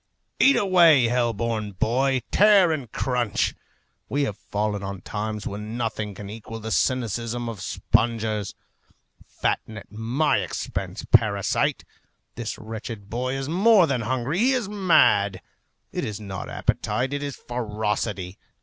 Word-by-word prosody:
Eat 275 - +6
away, 170 - +5
hell 120 -1 +2
born 110 -2 -3
boy! 130 +6 +1
Tear 200 -4 +6
and 135 -8 -3
crunch! 120 -5 0 0.6
We 145 +1 +1
have 105 -8 -2
fallen 105 0 -2
on 100 -1 -5
times 105 +2 -4
when 105 +3 -5
nothing 110 -3 -3
can 100 +1 -8
equal 115 +2 -8
the 110 0 -6
cynicism 120 -1 0
of 110 -4 -6
spongers. 110 -3 0 0.7
Fatten 110 - -3
at 100 - -11
my 115 +7 +1
expense, 90 - -4
parasite! 100 -3 +2 0.5
This 115 -2 -5
wretched 110 -2 -7
boy 130 +3 -2
is 135 0 -3
more 195 +4 +5
than 135 -6 -1
hungry; 130 - -1
he 255 +4 +4
is 245 -6 -1
mad. 105 - +3 0.5
It - - -3
is 105 -1 -4
not 95 -3 -6
appetite, 130 +3 -1
it 145 - -2
is 145 -2 -4
ferocity. 105 -5 -3
115 Hz, 140 wpm, -24 LUFS, 105-135 Hz, 0.7 s, Eat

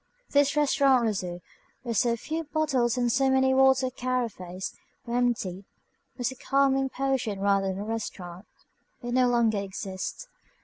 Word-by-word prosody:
This 285 0 +3
Restaurant 275 -3 +4
Rousseau, 180 -5 -3 0.4
where 240 -2 -3
so 235 +2 +2
few 315 +7 -4
bottles 280 -6 0
and 245 -1 +1
so 270 +2 +2
many 265 0 +3
water 265 -1 +4
carafes 230 -8 -3 0.3
were 235 0 -3
emptied, 225 -7 0 0.5
was 245 0 -1
a - - -9
calming 270 0 +1
potion 260 -7 -1
rather 195 0 +2
than 190 0 -2
a 200 - -4
restaurant. 205 -4 -6 0.6
It 240 0 -3
no 255 0 +4
longer 235 -3 +2
exists. 195 - -5
245 Hz, 145 wpm, -27 LUFS, 200-265 Hz, 0.6 s, Restaurant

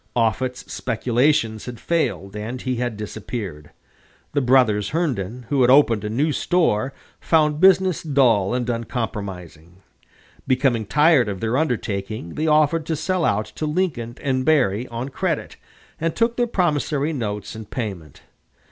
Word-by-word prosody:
Offutt's 125 +2 0
speculations 120 -1 0
had 120 -1 -7
failed, 130 - -1
and 115 +4 -5
he 130 -1 -1
had 120 -3 -2
disappeared. 105 -7 -6 0.6
The 145 - +2
brothers 120 -6 +3
Herndon, 125 - -2
who 140 -2 +2
had 125 - +5
opened 120 -6 +5
a 105 - -3
new 140 +8 +1
store, 140 - +1 0.3
found 150 -2 +2
business 190 -1 +4
dull 125 - +2
and 125 -1 -2
unpromising. 100 - -5 0.6
Becoming 130 -5 +1
tired 150 -3 +4
of 95 -2 -4
their 115 +4 -1
undertaking, 110 - -2
they 155 - -1
offered 155 +1 +3
to 160 - 0
sell 180 +3 -1
out 105 -6 +1
to 155 - -3
Lincoln 150 -8 -2
and 130 -2 0
Berry 130 -6 +2
on 120 +3 -5
credit, 140 - -3 0.4
and 165 0 -1
took 230 0 +1
their 240 0 +1
promissory 155 - 0
notes 105 -7 -4
in 110 0 -8
payment. 95 - -6
125 Hz, 145 wpm, -22 LUFS, 110-150 Hz, 0.6 s, had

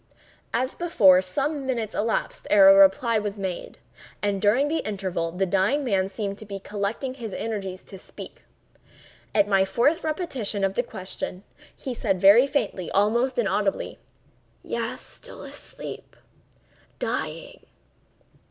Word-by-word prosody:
As 255 +3 -1
before, 200 - +5
some 275 +9 -2
minutes 230 -5 -2
elapsed 225 +1 -2
ere 195 -2 +8
a - - +10
reply 195 +4 +5
was 210 0 -4
made; 190 -3 -5 0.4
and 200 -2 -1
during 240 +8 +3
the 320 +2 0
interval 185 -5 -3
the 185 +3 0
dying 195 +10 +1
man 195 -6 +1
seemed 200 0 -4
to 215 - -9
be 200 -1 -5
collecting 210 +6 -3
his 230 -6 -7
energies 195 -4 -4
to 195 - -11
speak. - - -11 0.9
At 205 -1 +4
my 195 -2 +4
fourth 285 - +1
repetition 275 - -2
of 195 0 +1
the 240 - +1
question, 190 -4 -7 0.3
he 260 - -5
said 195 -5 -1
very 205 +8 +7
faintly, 200 - -2
almost 235 +6 +2
inaudibly: - - 0 0.6
"Yes; - - -3
still - - -8
asleep—dying." - - -8
205 Hz, 135 wpm, -25 LUFS, 195-255 Hz, 0.9 s, a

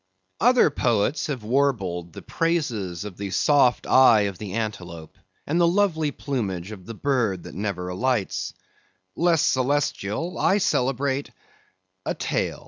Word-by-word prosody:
Other 245 - +5
poets 120 +3 0
have 135 -7 -4
warbled 105 - 0
the - - -10
praises 120 - -2
of 100 -4 -8
the 100 -1 -4
soft 135 +4 +3
eye 125 -5 +6
of 100 -3 -2
the 100 -3 -6
antelope, 90 -7 -5 0.3
and 165 +4 +1
the 170 - +5
lovely 170 -4 +2
plumage 105 -11 -4
of 95 -4 -10
the 115 - -7
bird 115 -10 0
that - - -10
never 95 -1 -3
alights; 110 +3 -1 0.6
less 170 -3 +3
celestial, 140 - 0
I 195 - +3
celebrate 135 - 0 0.7
a - - -2
tail. - - -2
120 Hz, 135 wpm, -24 LUFS, 100-145 Hz, 0.7 s, eye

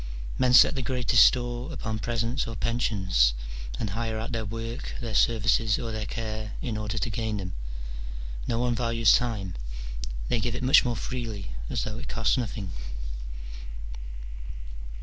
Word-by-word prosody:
Men 125 -1 +4
set - - +9
the 135 - -1
greatest 125 -3 +5
store 120 +3 +2
upon 110 -7 -3
presents 115 +3 0
or 115 - -4
pensions, 95 - +2 0.4
and 105 - -1
hire 110 +1 -1
out 110 +3 -3
their 115 -2 -1
work, 115 +2 -4
their 115 -3 -4
services, 110 +1 +4
or 115 -2 -3
their 110 -1 -3
care 110 -2 -4
in 120 -7 -2
order 105 +1 -2
to 120 - 0
gain 110 0 -1
them: 90 -2 -4 0.9
no 115 - +1
one 120 0 +2
values 115 -2 +4
time: 105 -7 +1 0.7
they 120 - +2
give 115 +2 -1
it 125 - -3
much 135 +4 +7
more 120 -2 0
freely, 115 - -4 0.2
as - - 0
though 110 +2 -4
it - - -6
cost 115 -3 +2
nothing. 110 -6 -2
115 Hz, 155 wpm, -28 LUFS, 110-120 Hz, 0.9 s, set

